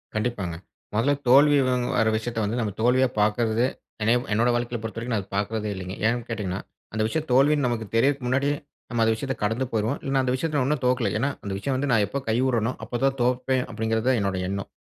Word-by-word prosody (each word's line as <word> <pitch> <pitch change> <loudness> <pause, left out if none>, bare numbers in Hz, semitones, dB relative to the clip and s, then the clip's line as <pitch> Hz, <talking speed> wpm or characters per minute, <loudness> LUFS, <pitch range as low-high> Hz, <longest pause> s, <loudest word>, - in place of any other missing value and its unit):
கண்டிப்பாங்க, 105 -6 -2 0.4
மொதல்ல 115 +7 +2
தோல்வி 145 +3 +7
வங் 125 -1 +1
வர 115 -3 +3
விஷயத்த 115 0 -3
வந்து 115 +4 -1
நம்ம 110 -3 -1
தோல்வியா 130 +3 +4
பார்க்குறது 110 +2 +2 0.4
என்ன 110 - +3 0.2
என்னோடய 120 +3 +3
வாழ்க்கையில 120 0 -2
பொறுத்தவரைக்கும் 115 +2 -4
நான் 100 - -1
அத - - -20
பார்க்றதே 105 +1 -1
இல்லைங்க. 95 0 -6
ஏன் 120 +1 +1
கேட்டிங்கன்னா, 100 -4 -3 0.3
அந்த 110 - -1
விஷயம் 155 +7 -2
தோல்வின்னு 140 +2 +4
நமக்கு 115 -2 -2
தெரியறதுக்கு 135 +2 +2
முன்னாடியே 140 +3 +1 0.3
நம்ம 120 -1 -1
அந்த 110 - +3
விஷயத்த 135 +3 -3
கடந்து 110 +5 0
போயிருவோம். 110 +5 0
இல்லைன்னா 135 0 +1
அந்த 125 - 0
விஷயத்த 155 +2 -1
நான் 130 -1 +1
இன்னும் 150 -2 -1
தோக்கல. 125 -4 +2
ஏன்னா 135 +5 +1
அந்த 100 -1 -4
விஷயம் 130 +7 -2
வந்து 145 +1 -1
நான் 105 -4 +4
எப்போ 140 - -3
கை 110 - +2
உட்றனோ, 120 -2 +1
அப்ப 120 +2 -4
தான் 135 0 +2
தோப்பேன். 125 +1 +1
அப்படிங்கிறது 110 +1 -1
தான் 130 - +3
என்னோட 100 -1 -1
எண்ணம். 100 +1 -4
120 Hz, 210 wpm, -25 LUFS, 110-130 Hz, 0.4 s, தோல்வி